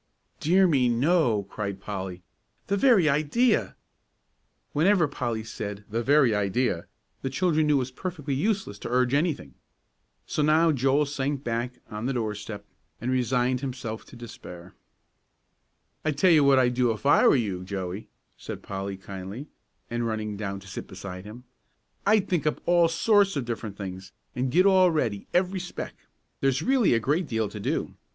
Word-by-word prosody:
"Dear 185 Hz, +5 st, +4 dB
me, 135 Hz, -8 st, +3 dB
no," 120 Hz, -, +2 dB
cried 100 Hz, 0 st, -5 dB
Polly. 95 Hz, -3 st, -6 dB, 0.4 s
"The 200 Hz, -, 0 dB
very 200 Hz, -, +5 dB
idea!" 155 Hz, -, +2 dB, 1.0 s
Whenever 170 Hz, +2 st, +4 dB
Polly 120 Hz, -5 st, -3 dB
said, 105 Hz, -2 st, -6 dB
"The 115 Hz, +2 st, 0 dB
very 135 Hz, -2 st, +4 dB
idea!" 105 Hz, -2 st, 0 dB, 0.3 s
the 135 Hz, -, -2 dB
children 155 Hz, 0 st, +1 dB
knew 150 Hz, -, +4 dB
it 130 Hz, -2 st, +2 dB
was 130 Hz, -, -11 dB
perfectly 150 Hz, -2 st, -4 dB
useless 190 Hz, -, -1 dB
to -, -, -6 dB
urge 125 Hz, +1 st, +2 dB
anything. 145 Hz, -, 0 dB, 0.7 s
So -, -, -2 dB
now 160 Hz, +2 st, +4 dB
Joel 135 Hz, +1 st, +2 dB
sank 140 Hz, 0 st, -2 dB
back 120 Hz, +2 st, -2 dB, 0.2 s
on 105 Hz, +3 st, -3 dB
the 135 Hz, -, 0 dB
doorstep 105 Hz, -3 st, -4 dB, 0.3 s
and 125 Hz, +2 st, -2 dB
resigned 125 Hz, 0 st, +1 dB
himself 125 Hz, -5 st, -5 dB
to -, -, -14 dB
despair. 90 Hz, -7 st, -10 dB, 1.3 s
"I 155 Hz, -, 0 dB
tell 175 Hz, +6 st, +4 dB
you 155 Hz, -3 st, +6 dB
what 140 Hz, -1 st, +5 dB
I'd 125 Hz, -1 st, +3 dB
do 125 Hz, -1 st, +2 dB
if 110 Hz, +4 st, -6 dB
I 145 Hz, -, +6 dB
were -, -, +6 dB
you, 100 Hz, -8 st, -1 dB
Joey," 95 Hz, +1 st, -5 dB, 0.3 s
said -, -, -8 dB
Polly, 95 Hz, 0 st, -5 dB
kindly, 95 Hz, +8 st, -8 dB, 0.4 s
and 120 Hz, 0 st, -2 dB
running 110 Hz, -2 st, -3 dB
down 100 Hz, -1 st, -4 dB
to 95 Hz, -, -14 dB
sit 95 Hz, -, -7 dB
beside 95 Hz, 0 st, -8 dB
him. 115 Hz, +4 st, -10 dB, 0.6 s
"I'd 210 Hz, -1 st, +4 dB
think 170 Hz, -4 st, 0 dB
up 150 Hz, -, 0 dB
all 175 Hz, -1 st, +4 dB
sorts 200 Hz, +3 st, +3 dB
of 140 Hz, -4 st, -2 dB
different 110 Hz, -3 st, -5 dB
things, 95 Hz, -1 st, -7 dB, 0.2 s
and 125 Hz, 0 st, -1 dB
get 180 Hz, +6 st, +4 dB
all 190 Hz, -2 st, +6 dB
ready, 115 Hz, -, -1 dB
every 185 Hz, +1 st, +1 dB
speck. 175 Hz, 0 st, -6 dB, 0.5 s
There's 135 Hz, -1 st, +1 dB
really 255 Hz, -, +3 dB
a -, -, +2 dB
great 150 Hz, +9 st, 0 dB
deal 110 Hz, -2 st, -1 dB
to 105 Hz, -, -8 dB
do. -, -, -2 dB
125 Hz, 170 wpm, -26 LUFS, 105-155 Hz, 1.3 s, you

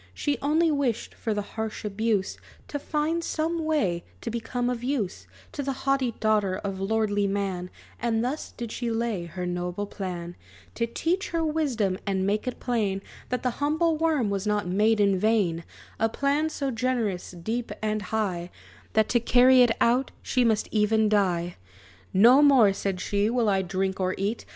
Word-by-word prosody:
She 290 Hz, -1 st, -1 dB
only 315 Hz, +3 st, +3 dB
wished, 270 Hz, -6 st, -1 dB
for 225 Hz, -, -4 dB
the 205 Hz, -1 st, -1 dB
harsh 220 Hz, +1 st, -5 dB
abuse, 210 Hz, -1 st, 0 dB, 0.3 s
To 290 Hz, -, -3 dB
find 315 Hz, +3 st, -1 dB
some 330 Hz, +1 st, -1 dB
way 200 Hz, -, 0 dB, 0.2 s
to 230 Hz, -, -4 dB
become 235 Hz, +2 st, -2 dB
of 245 Hz, -1 st, -2 dB
use 245 Hz, -8 st, -2 dB, 0.2 s
To 285 Hz, -, -4 dB
the 275 Hz, -1 st, -2 dB
haughty 270 Hz, -3 st, +2 dB
daughter 210 Hz, -3 st, +2 dB
of 195 Hz, -2 st, -4 dB
lordly 205 Hz, 0 st, +1 dB
man; 195 Hz, -2 st, -2 dB, 0.3 s
And 230 Hz, -1 st, +1 dB
thus 280 Hz, +5 st, -3 dB
did 235 Hz, -2 st, -5 dB
she 240 Hz, 0 st, -3 dB
lay 225 Hz, -5 st, -1 dB
her 180 Hz, +1 st, -5 dB
noble 180 Hz, +2 st, -3 dB
plan 175 Hz, -4 st, -6 dB, 0.4 s
To 230 Hz, -, -1 dB
teach 340 Hz, +11 st, -1 dB
her 335 Hz, -1 st, 0 dB
wisdom, 250 Hz, -12 st, 0 dB
and 190 Hz, -1 st, 0 dB
make 210 Hz, +4 st, 0 dB
it 250 Hz, -, -3 dB
plain 205 Hz, -6 st, -1 dB, 0.3 s
That 250 Hz, -, -2 dB
the 250 Hz, -, +1 dB
humble 315 Hz, +3 st, +2 dB
worm 305 Hz, -9 st, +1 dB
was 200 Hz, +1 st, -2 dB
not 210 Hz, -3 st, 0 dB
made 210 Hz, +4 st, +2 dB
in 200 Hz, -2 st, +3 dB
vain; 195 Hz, -6 st, +1 dB, 0.4 s
A 225 Hz, -, +2 dB
plan 285 Hz, +6 st, +1 dB
so 280 Hz, -3 st, -2 dB
generous, 230 Hz, -6 st, -1 dB
deep 220 Hz, +7 st, -4 dB
and 215 Hz, 0 st, -1 dB
high, 185 Hz, -4 st, -2 dB, 0.4 s
That 220 Hz, -1 st, +3 dB
to 240 Hz, -, +3 dB
carry 250 Hz, +2 st, +6 dB
it 245 Hz, -, +6 dB
out, 250 Hz, +3 st, +3 dB
she 255 Hz, -, +1 dB
must 220 Hz, -3 st, +2 dB
even 215 Hz, 0 st, +3 dB
die! 180 Hz, -4 st, +1 dB, 0.5 s
"No 240 Hz, +8 st, +7 dB
more," 260 Hz, -9 st, +6 dB
said 195 Hz, -1 st, -2 dB
she, 205 Hz, +3 st, 0 dB
"will 235 Hz, -1 st, +1 dB
I 195 Hz, -2 st, +3 dB
drink 190 Hz, +1 st, -2 dB
or 185 Hz, 0 st, 0 dB
eat! 205 Hz, +4 st, -2 dB
220 Hz, 175 wpm, -26 LUFS, 195-255 Hz, 0.5 s, No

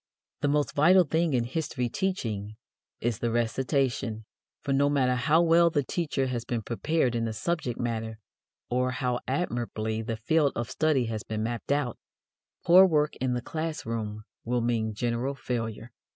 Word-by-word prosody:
The -, -, +2 dB
most 145 Hz, 0 st, +1 dB
vital 180 Hz, +6 st, +6 dB
thing 160 Hz, -1 st, +1 dB
in 120 Hz, -, +2 dB
history 125 Hz, -1 st, -2 dB
teaching 110 Hz, -, -3 dB, 0.5 s
is 115 Hz, -2 st, -1 dB
the 120 Hz, -, 0 dB
recitation, 120 Hz, -1 st, 0 dB, 0.3 s
for 140 Hz, -, -2 dB
no 140 Hz, +1 st, +3 dB
matter 130 Hz, -3 st, +2 dB
how 150 Hz, +7 st, +3 dB
well 170 Hz, 0 st, +5 dB
the 145 Hz, -4 st, 0 dB
teacher 145 Hz, -2 st, -1 dB
has 125 Hz, -3 st, -2 dB
been 120 Hz, -3 st, -3 dB
prepared 130 Hz, +3 st, 0 dB
in 115 Hz, -1 st, 0 dB
the 110 Hz, -, -2 dB
subject 125 Hz, +1 st, -2 dB
matter 115 Hz, -2 st, -3 dB, 0.5 s
or 125 Hz, +1 st, +1 dB
how 125 Hz, -1 st, -1 dB
admirably 120 Hz, -6 st, -2 dB
the 115 Hz, 0 st, -3 dB
field 145 Hz, +5 st, +2 dB
of 120 Hz, -1 st, -3 dB
study 155 Hz, -6 st, +2 dB
has 110 Hz, -1 st, -3 dB
been 110 Hz, 0 st, -4 dB
mapped 120 Hz, +3 st, -3 dB
out, 140 Hz, -5 st, 0 dB, 0.7 s
poor 185 Hz, +3 st, +8 dB
work 150 Hz, -3 st, +1 dB
in 125 Hz, -1 st, 0 dB
the 120 Hz, -, -3 dB
class 160 Hz, +2 st, -4 dB
room 110 Hz, -2 st, -4 dB, 0.2 s
will 120 Hz, +1 st, 0 dB
mean 115 Hz, -2 st, 0 dB
general 120 Hz, +4 st, -1 dB
failure. 115 Hz, -3 st, -4 dB
125 Hz, 165 wpm, -28 LUFS, 115-145 Hz, 0.7 s, poor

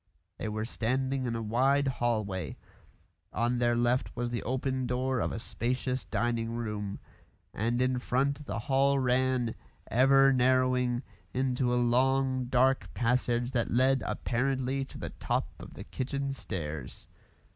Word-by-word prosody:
They 110 Hz, -, -3 dB
were 110 Hz, +1 st, -2 dB
standing 130 Hz, +3 st, -1 dB
in 115 Hz, -, -2 dB
a 115 Hz, -, -3 dB
wide 135 Hz, +6 st, +2 dB
hall 120 Hz, -4 st, 0 dB
way; 95 Hz, -4 st, -5 dB, 0.7 s
on 120 Hz, +2 st, 0 dB
their 120 Hz, -1 st, +2 dB
left 120 Hz, +2 st, +1 dB
was 120 Hz, 0 st, -2 dB
the 120 Hz, -, -2 dB
open 130 Hz, +1 st, -1 dB
door 130 Hz, +1 st, 0 dB
of -, -, 0 dB
a -, -, -4 dB
spacious 125 Hz, +1 st, -2 dB
dining 115 Hz, +3 st, -1 dB
room, 105 Hz, -4 st, -3 dB, 0.6 s
and 120 Hz, +3 st, 0 dB
in 130 Hz, 0 st, +2 dB
front 140 Hz, +4 st, 0 dB
the -, -, -3 dB
hall 140 Hz, +3 st, +2 dB
ran, 130 Hz, -2 st, +1 dB, 0.4 s
ever 135 Hz, +2 st, +5 dB
narrowing, 125 Hz, -1 st, +2 dB, 0.3 s
into 125 Hz, -1 st, +1 dB
a -, -, +2 dB
long, 130 Hz, +2 st, +2 dB
dark 130 Hz, +2 st, +2 dB
passage 120 Hz, 0 st, +1 dB
that 120 Hz, -3 st, 0 dB
led 130 Hz, +2 st, +3 dB
apparently 130 Hz, +2 st, -1 dB
to -, -, -12 dB
the -, -, -5 dB
top -, -, -2 dB
of -, -, -11 dB
the -, -, -7 dB
kitchen 140 Hz, +1 st, -3 dB
stairs. 75 Hz, -, -6 dB
125 Hz, 145 wpm, -30 LUFS, 120-130 Hz, 0.7 s, ever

